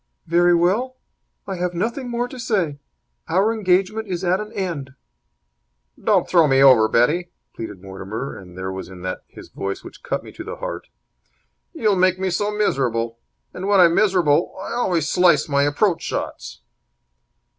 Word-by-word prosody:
"Very 175 +1 +4
well. 215 +10 +1 0.5
I 190 -2 -4
have 180 0 -2
nothing 235 +7 -2
more 240 +1 -1
to 255 +1 -10
say. 185 - -1 0.5
Our 195 +7 +2
engagement 205 +1 +1
is 180 -1 -3
at 185 +1 +2
an 210 0 -6
end." 150 -9 -4 1.1
"Don't - - +3
throw 170 -4 +5
me 135 -1 +3
over, 130 -5 +7
Betty," 150 +11 +2 0.3
pleaded 105 -4 -7
Mortimer, 100 +7 -6
and 90 -2 -12
there 95 0 -4
was 95 0 -6
that 95 - -11 0.3
in - - -32
his - - -11
voice 100 0 -5
which - - -12
cut - - -3
me - - -11
to - - -9
the - - -6
heart. - - -6 0.8
"You'll 210 -2 +1
make 185 0 +3
me 190 0 -1
so 205 +4 0
miserable. 120 - -1 0.3
And, 185 +2 -5
when 200 -1 +4
I'm 170 -2 +6
miserable, 175 -6 +2
I 190 - -5
always 180 -10 0
slice 175 -5 +4
my 140 -2 +2
approach 160 +6 +1
shots." - - -5
175 Hz, 165 wpm, -21 LUFS, 135-195 Hz, 1.1 s, over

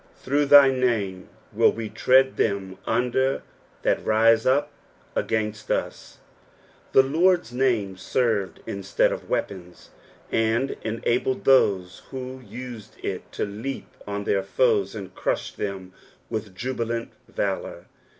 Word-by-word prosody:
"Through 145 +2 0
thy 140 -1 +8
name 110 -8 -1 0.2
will - - +5
we 115 -1 -5
tread 130 +5 +3
thtm 100 -3 -1
under 130 +2 +1 0.4
that - - +1
rite 115 +1 +4
up 145 +3 +2 0.4
ogaitiH 105 -1 -2
ut.*' - - -3 0.7
The 135 - +7
Lord's 165 -1 +2
name 115 -7 +1
served 105 0 -1
instead 100 -1 0
of - - -6
weapons, 90 -3 -4 0.4
and 115 +4 +1
enabled 120 +3 -1
those 100 -9 +3
who 130 0 -6
need 120 -1 -8 0.2
it - - -4
to - - -1
leap 110 +7 -6 0.2
OD 100 0 -3
their 100 - +2
foes 105 0 +1
and 100 -3 -7
crush - - -2
them 95 -2 -5 0.4
with 105 -3 -4
jabilant 115 0 -3 0.2
valour. - - -3
115 Hz, 120 wpm, -25 LUFS, 100-130 Hz, 0.7 s, thy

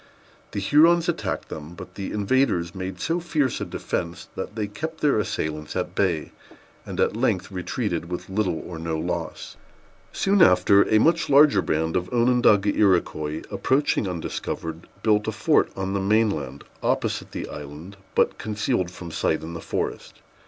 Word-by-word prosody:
The - - -1
Hurons 165 - +5
attacked 175 - -2
them; 80 +3 -8
but - - -10
the 100 - -5
invaders 105 -5 +1
made 95 0 -5
so 165 +1 0
fierce 150 -7 0
a - - -1
defence, 85 0 -4
that - - -5
they 110 -2 -1
kept 160 +10 -6
their 145 -7 +3
assailants 75 -6 -3
at 90 -1 -2
bay, 90 -6 0 0.6
and - - -6
at - - +2
length 110 -6 0
retreated 90 -2 -3
with 90 - -5
little 95 -4 -1
or 85 -3 -7
no 80 -1 -2
loss. 85 0 -4 0.5
Soon 195 0 +2
after, 95 - +5
a 110 - +6
much 165 +6 +3
larger 140 -7 +6
band 80 0 -1
of 90 0 -1
Onondaga 120 -4 +3
Iroquois, 80 -6 +1
approaching 135 -6 +1
undiscovered, 85 -1 -5 0.2
built 105 -1 +2
a - - +1
fort - - +2
on 95 0 -3
the 100 - 0
main 105 +2 +3
land, 70 -4 -6 0.2
opposite - - -1
the - - -5
island, 75 +6 -9 0.2
but - - +2
concealed 110 -2 -1
from 85 -2 -9
sight 80 - 0
in 80 +1 -6
the 85 - -6
forest. - - -4
95 Hz, 165 wpm, -24 LUFS, 85-115 Hz, 0.6 s, a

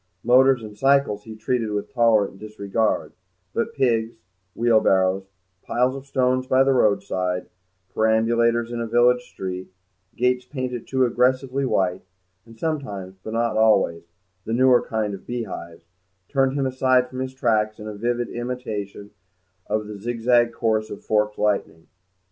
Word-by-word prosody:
Motors 130 0 +5
and 105 -1 -9
cycles 135 -4 +2
he 110 -1 -9
treated 115 +1 -1
with 105 +4 -4
tolerant 110 -5 +2
disregard, 105 0 -2 0.4
but 230 0 -2
pigs, 115 -3 +1 0.4
wheelbarrows, 95 -5 +2 0.3
piles 125 +2 0
of 135 0 -9
stones 130 -1 +1
by 130 +1 +4
the 135 0 +3
roadside, 100 -5 0 0.5
perambulators 115 +1 +2
in 120 -1 -3
a 115 - -3
village 120 +2 +4
street, 95 -5 -7 0.4
gates 125 +1 +1
painted 125 -3 -5
too 130 -1 +2
aggressively 130 +2 +1
white, 95 -6 0 0.5
and 115 0 -15
sometimes, 105 - -4
but 110 - -6
not 115 -1 0
always, 105 -6 +3 0.4
the 110 - -4
newer 125 0 +5
kind 110 -2 -2
of 95 - -10
beehives, 100 -8 -6 0.4
turned 135 -2 +1
him 140 -1 0
aside 130 -1 +2
from 130 - -8
his 130 0 -4
tracks 110 -4 +1
in 105 -1 -7
vivid 120 +1 -1
imitation 110 -5 -5 0.6
of 110 0 -1
the 105 -1 -8
zigzag 120 +1 +2
course 110 -2 0
of 100 - -9
forked 105 -1 +1
lightning. 85 -6 -1
115 Hz, 145 wpm, -23 LUFS, 105-125 Hz, 0.6 s, Motors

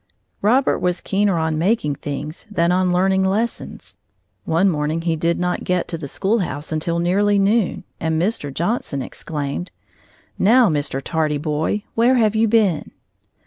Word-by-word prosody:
Robert 250 +6 +3
was 180 0 0
keener 200 -2 +1
on 160 -1 0
making 175 -5 +1
things 145 +5 -6
than 170 -4 +1
on 180 0 +2
learning 190 +1 +2
lessons. 210 +5 -3 0.5
One 165 +4 +2
morning 155 -1 0
he 165 -1 0
did 170 +2 0
not 180 0 -1
get 180 -1 0
to 165 - -3
the 145 - -6
schoolhouse 185 - -2
until 160 +2 -1
nearly 200 +4 +2
noon, 200 +1 +1 0.2
and 160 -1 0
Mr. 175 -6 -1
Johnson 165 - -2
exclaimed: 150 +3 -5 0.7
"Now, 235 +2 +5
Mr. 145 -3 -1
Tardy 155 -1 0
Boy, 155 +7 -1
where 240 +3 +3
have 220 -3 +2
you 225 +1 +3
been?" 210 -8 +2
180 Hz, 150 wpm, -20 LUFS, 155-205 Hz, 0.7 s, Now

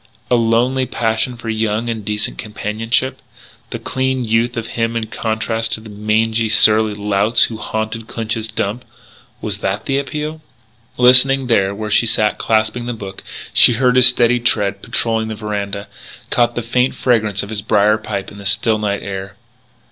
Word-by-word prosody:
A - - +5
lonely 120 +3 +1
passion 115 +1 -1
for 115 - -10
young 110 +1 -1
and 115 -2 -3
decent 105 +1 -3
companionship? 110 +4 -2 0.5
The - - -5
clean 130 -1 -2
youth 115 +2 0
of 115 - -3
him 115 0 -1
in 115 - -2
contrast 110 +1 -2
to - - -1
the 110 -1 -12
mangy, 110 +2 0
surly 110 -1 +4
louts 105 +2 +2
who 115 - -2
haunted 110 +1 -4
Clinch's 110 -1 -3
Dump, 110 +2 -2 0.6
was - - -4
that 95 +2 -3
the 135 0 0
appeal? 150 +2 -5 0.6
Listening 130 +2 +6
there 100 -5 +1
where 105 0 -5
she 115 - +4
sat 105 -1 +1
clasping 110 +2 0
the 120 - -2
book, 100 -4 -9 0.3
she 120 - +7
heard 125 +1 +2
his 125 -1 +8
steady 120 -1 +3
tread 100 -4 0
patrolling 115 0 -1
the 110 - -5
veranda; 100 -2 -4 0.4
caught 120 -1 +2
the 120 - -3
faint 125 +3 0
fragrance 110 -5 +1
of 100 - -8
his 110 -2 -4
brier 105 +1 +2
pipe 100 -2 -5
in 100 - -12
the 100 - -10
still 110 +1 +1
night 100 -1 -2
air. 95 0 -6
110 Hz, 170 wpm, -17 LUFS, 105-120 Hz, 0.6 s, his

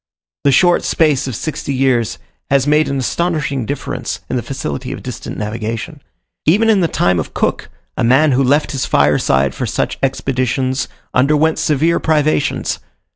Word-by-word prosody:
The 140 - +5
short 175 +6 +4
space 150 -5 +2
of 130 - -4
sixty 145 -1 -4
years 130 -4 +1 0.3
has 135 -1 +3
made 150 +1 +3
an 140 - -1
astonishing 140 -3 -1
difference 145 - -4
in - - 0
the 125 - 0
facility 120 - -5
of - - -7
distant - - -6
navigation. 115 +7 -4 0.5
Even 220 +8 +4
in 200 -3 +3
the 170 - +3
time 90 - +1
of 80 - -5
Cook, - - -1 0.3
a - - -1
man 135 +6 +4
who 130 +1 +2
left 145 +4 +2
his 135 -3 -2
fireside 70 -2 +2
for - - -3
such - - -2
expeditions 130 0 -1 0.3
underwent 150 +4 +2
severe 160 +3 +2
privations. 155 -2 0
135 Hz, 160 wpm, -17 LUFS, 125-155 Hz, 0.5 s, The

